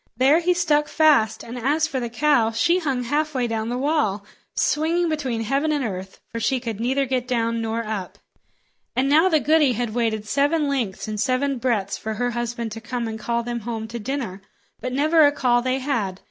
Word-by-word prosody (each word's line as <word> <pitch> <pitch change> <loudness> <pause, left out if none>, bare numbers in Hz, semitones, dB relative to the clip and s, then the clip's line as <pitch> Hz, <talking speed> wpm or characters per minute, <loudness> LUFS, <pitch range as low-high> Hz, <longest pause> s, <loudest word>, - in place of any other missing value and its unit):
There 275 +6 +5
he 355 +1 +1
stuck 300 -4 +2
fast; 290 -9 +3
and 240 +2 -7
as 295 +6 +1
for 280 -4 -3
the 240 -1 -3
cow, 240 -2 +2
she 340 +11 +2
hung 270 -7 -1
halfway 290 0 0
down 225 -1 -2
the 245 - -2
wall, 260 -8 0 0.3
swinging 330 +3 +1
between 265 -7 -2
heaven 275 +7 0
and 290 -4 0
earth, 190 -2 -6
for 230 - -4
she 260 +3 +1
could 230 -4 -5
neither 265 +4 +1
get 255 -1 -2
down 230 -2 0
nor 225 +1 -2
up. 210 -4 -5 0.8
And 260 +2 +2
now 315 +6 +5
the 315 -3 +3
goody 300 -3 +3
had 235 -1 -2
waited 220 -3 -1
seven 290 +4 +1
lengths 245 -10 -2
and 215 -1 -4
seven 265 0 0
breadths 220 -6 -1
for 220 0 -4
her 245 +2 -1
husband 235 -1 -3
to 225 +1 -7
come 235 0 -3
and 220 0 -5
call 235 +2 -1
them 240 0 -3
home 225 0 -5
to 235 +1 -5
dinner; 220 -5 -4 0.4
but 255 - -4
never 310 +5 +4
a 290 - +6
call 250 -4 +2
they 255 +1 0
had. 230 -9 -2
245 Hz, 205 wpm, -23 LUFS, 225-290 Hz, 0.8 s, a